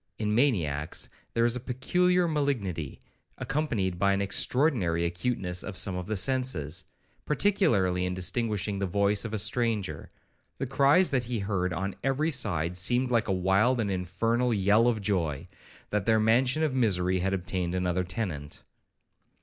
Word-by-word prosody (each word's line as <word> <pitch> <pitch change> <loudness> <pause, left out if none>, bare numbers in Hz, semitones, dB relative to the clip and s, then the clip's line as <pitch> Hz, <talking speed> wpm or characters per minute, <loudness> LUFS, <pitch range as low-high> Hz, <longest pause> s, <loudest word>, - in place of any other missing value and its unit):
In 105 -1 -1
maniacs 85 - 0 0.3
there 115 0 +3
is 120 0 +1
a - - -2
peculiar 175 +9 +1
malignity, 120 - -2 0.4
accompanied 110 - -2
by 100 +1 +3
an 100 - 0
extraordinary 100 - +1
acuteness 90 0 -2
of 100 -3 -7
some 95 0 -1
of 90 -1 -5
the 110 - -2
senses, 95 - -1 0.4
particularly 105 - +1
in 90 - -3
distinguishing 105 +1 -1
the 100 - -1
voice 100 +3 +1
of 115 - -4
a 110 - -2
stranger. 110 -1 -1 0.5
The - - -2
cries 140 +7 +4
that 125 -3 0
he 120 0 -3
heard 100 -3 -1
on 95 +3 -3
every 140 +4 +1
side 90 - 0
seemed 125 +7 +2
like 115 -2 +2
a - - 0
wild 95 +7 +2
and 105 -3 0
infernal 115 +7 0
yell 105 +4 +3
of 115 -3 +1
joy, 85 -8 -1 0.5
that 105 -1 -1
their 110 -1 +4
mansion 125 +7 +2
of 150 -4 0
misery 95 -7 +1
had 95 +2 0
obtained 90 -1 -3
another 90 0 0
tenant. 90 -7 -5
105 Hz, 160 wpm, -28 LUFS, 90-125 Hz, 0.5 s, cries